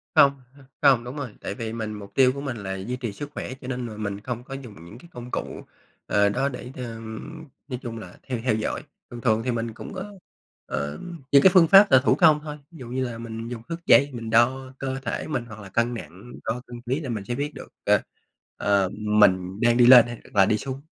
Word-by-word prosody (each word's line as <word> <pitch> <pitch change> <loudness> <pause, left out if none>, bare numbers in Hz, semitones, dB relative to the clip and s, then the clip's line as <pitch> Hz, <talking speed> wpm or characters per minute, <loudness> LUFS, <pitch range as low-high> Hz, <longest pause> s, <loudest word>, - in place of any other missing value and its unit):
Hông, 140 - +7 0.2
h 140 - -19 0.2
hông, 135 -5 +5
đúng 125 +3 -7
rồi, 135 -7 -6
tại 100 - -4
vì 110 0 -5
mình 110 -2 -4
mục 100 -1 -10
tiêu 130 -1 +5
của 140 - -6
mình 135 -4 -4
là 95 -2 -4
duy 100 +6 -4
trì 120 -5 -4
sức 145 +7 -7
khỏe, 130 - -5
cho 125 - -8
nên 125 -1 -3
là 110 -2 -8
mình 100 -2 -4
không 120 +1 -5
có 135 - -9
dùng 130 -6 -8
những 105 +6 -12
cái 170 +7 -16
công 120 0 -9
cụ, - - -4 0.5
ờ, 100 0 +3
đó 135 +7 0
để, 125 -1 -8
ờm, 115 +4 -7 0.2
nói 125 -3 -5
chung 115 -3 -6
là 90 -5 -11
theo 125 -3 -4
theo 120 -4 +2
dõi. 110 - -3 0.3
Thường 120 -1 -8
thường 110 -2 +2
thì 125 - 0
mình 115 -1 -3
cũng 120 - -9
có, 195 +2 -7 0.5
ờ, 75 +1 -4 0.3
những 140 - +7
cái 190 - +8
phương 175 -3 +7
pháp 200 +3 +8
là 130 - +8
thủ - - +4
công 155 -1 +5
thôi, 150 -1 -6
ví 170 - -13
dụ 125 - -8
như 130 +2 -2
là 120 -2 -5
mình 115 0 -6
dùng 120 -1 -6
thước 170 0 -6
dây 140 +1 +6
mình 115 -2 -6
đo 130 +3 +2
cơ 135 0 -3
thể - - -3
mình 125 -6 -2
hoặc 110 -2 -11
là 100 -2 -10
cân 115 +4 0
nặng, 95 +3 -9
đo 120 +2 -2
cân 120 -1 -9
ký 130 +4 -2
là 145 -5 -6
mình 110 -4 -3
sẽ 120 - -3
biết 145 +3 -3
được, - - -9 0.2
ờ, - - +4 0.6
ờ, 100 -2 +2
mình 100 -3 +3
đang 120 0 +4
đi 120 - +6
lên 120 -1 +9
hay 120 0 -6 0.2
là 100 -2 +6
đi 105 - +2
xuống. 135 +3 -6
120 Hz, 250 wpm, -25 LUFS, 110-135 Hz, 0.6 s, lên